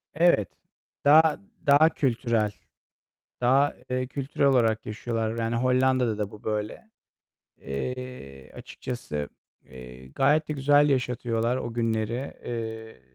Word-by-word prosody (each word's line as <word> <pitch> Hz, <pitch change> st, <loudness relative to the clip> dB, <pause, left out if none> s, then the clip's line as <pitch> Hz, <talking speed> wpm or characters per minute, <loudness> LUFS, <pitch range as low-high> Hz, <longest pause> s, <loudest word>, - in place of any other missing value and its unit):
Evet, 165 Hz, -, +3 dB, 0.6 s
daha, 155 Hz, +2 st, +6 dB, 0.3 s
daha 145 Hz, +3 st, +6 dB
kültürel. 115 Hz, -7 st, 0 dB, 0.9 s
Daha, 135 Hz, +4 st, +3 dB, 0.2 s
eee, 130 Hz, 0 st, -1 dB
kültürel 140 Hz, +1 st, -1 dB
olarak 115 Hz, -5 st, +2 dB
yaşıyorlar. 115 Hz, +1 st, -3 dB
Yani, 115 Hz, +1 st, -1 dB
Hollanda'da 130 Hz, -2 st, +2 dB
da 105 Hz, -1 st, -2 dB
bu 105 Hz, -, -14 dB
böyle. 105 Hz, -, -4 dB, 0.7 s
Eee, 70 Hz, -, -6 dB
açıkçası, 75 Hz, -, -6 dB, 0.4 s
eee, 65 Hz, 0 st, -12 dB
gayet 150 Hz, -, +2 dB
de -, -, -1 dB
güzel 145 Hz, +1 st, +4 dB
yaşatıyorlar 125 Hz, -2 st, 0 dB
o 120 Hz, -, -4 dB
günleri. 115 Hz, +2 st, -2 dB
Eee, 110 Hz, -, -6 dB
120 Hz, 110 wpm, -26 LUFS, 110-135 Hz, 0.9 s, daha